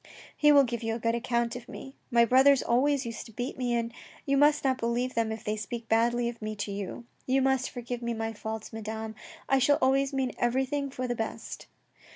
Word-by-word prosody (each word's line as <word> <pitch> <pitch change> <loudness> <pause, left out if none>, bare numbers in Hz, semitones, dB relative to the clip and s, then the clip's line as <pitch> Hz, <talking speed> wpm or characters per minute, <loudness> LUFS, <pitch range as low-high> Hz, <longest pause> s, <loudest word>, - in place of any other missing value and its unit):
He 295 -1 +5
will 285 -1 +7
give 235 -3 -3
you 225 -1 -1
a - - -5
good 230 0 0
account 235 0 0
of 245 0 -9
me. 270 +1 -9
My 235 -2 +5
brothers 265 +3 +5
always 270 +3 +2
used 230 0 -6
to - - -13
beat 245 +5 -4
me, 245 -2 -1
and 230 0 -2 0.3
you 275 - +2
must 295 +1 +4
not 260 -1 +1
believe 240 +2 -1
them 225 -1 0
if 220 - -6
they 210 - -1
speak 225 +2 -6
badly 235 +1 +2
of 235 -1 -6
me 215 0 -4
to 205 0 -4
you. 200 +4 -5 0.2
You 265 +1 +3
must 265 -1 +1
forgive 245 0 -5
my 225 -1 -2
faults, 220 0 -6
Madame. 220 0 -5 0.3
I 270 - +3
shall 285 +2 +4
always 270 +1 +2
mean 265 -2 -1
everything 265 +3 0
for 255 -1 -4
the 245 - 0
best." 225 -2 -5
240 Hz, 215 wpm, -28 LUFS, 225-265 Hz, 0.3 s, will